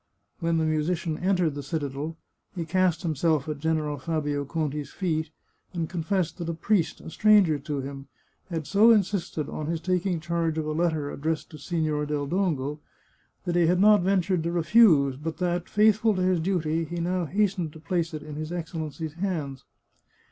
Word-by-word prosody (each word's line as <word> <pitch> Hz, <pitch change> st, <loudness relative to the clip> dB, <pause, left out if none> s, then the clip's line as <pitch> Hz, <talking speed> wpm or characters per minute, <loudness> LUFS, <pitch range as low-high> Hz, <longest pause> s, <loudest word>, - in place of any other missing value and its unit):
When 165 Hz, 0 st, +1 dB
the 160 Hz, -, +1 dB
musician 155 Hz, +1 st, 0 dB
entered 180 Hz, -4 st, +1 dB
the 145 Hz, -, -5 dB
citadel 150 Hz, 0 st, -4 dB, 0.4 s
he 170 Hz, -2 st, -3 dB
cast 180 Hz, 0 st, +1 dB
himself 155 Hz, -2 st, +1 dB
at 150 Hz, -2 st, -4 dB
General 155 Hz, -2 st, -1 dB
Fabio 145 Hz, -1 st, -2 dB
Conti's 150 Hz, -1 st, -3 dB
feet, 160 Hz, -4 st, -2 dB, 0.4 s
and 170 Hz, -2 st, -2 dB
confessed 180 Hz, +1 st, -2 dB
that 170 Hz, -1 st, -3 dB
a 170 Hz, -, -2 dB
priest, 175 Hz, 0 st, 0 dB
a -, -, -9 dB
stranger 200 Hz, -8 st, +4 dB
to 145 Hz, -1 st, -3 dB
him, 135 Hz, 0 st, -7 dB, 0.4 s
had 165 Hz, -4 st, -3 dB
so 210 Hz, +7 st, +5 dB
insisted 195 Hz, -8 st, +1 dB
on 155 Hz, -, -5 dB
his 165 Hz, 0 st, -1 dB
taking 180 Hz, 0 st, 0 dB
charge 165 Hz, 0 st, -1 dB
of 155 Hz, -, -1 dB
a 155 Hz, -, -2 dB
letter 155 Hz, -2 st, 0 dB
addressed 155 Hz, +2 st, -3 dB
to 155 Hz, -, -9 dB
Sig^or 155 Hz, -1 st, -1 dB
del 145 Hz, -1 st, -1 dB
Dongo, 150 Hz, -4 st, -1 dB, 0.7 s
that 175 Hz, -, -1 dB
he 175 Hz, -2 st, +4 dB
had 180 Hz, +1 st, +3 dB
not 210 Hz, 0 st, +6 dB
ven 190 Hz, +1 st, +3 dB
tured 180 Hz, -1 st, 0 dB
to 170 Hz, +1 st, -2 dB
refuse, 165 Hz, -, +5 dB
but 160 Hz, +3 st, -5 dB
that, 175 Hz, -1 st, -1 dB
faithful 215 Hz, 0 st, +4 dB
to 185 Hz, -, 0 dB
his 185 Hz, -1 st, +2 dB
duty, 165 Hz, -2 st, 0 dB
he 170 Hz, +2 st, -5 dB
now 180 Hz, +1 st, 0 dB
has 200 Hz, +4 st, +1 dB
tened 170 Hz, -5 st, -3 dB
to 160 Hz, -, -11 dB
place 170 Hz, 0 st, -1 dB
it 150 Hz, -, -6 dB
in 150 Hz, -1 st, -8 dB
his 155 Hz, +1 st, -5 dB
Excellency's 160 Hz, -2 st, -5 dB
hands. 160 Hz, -7 st, -3 dB
165 Hz, 185 wpm, -26 LUFS, 155-180 Hz, 0.7 s, not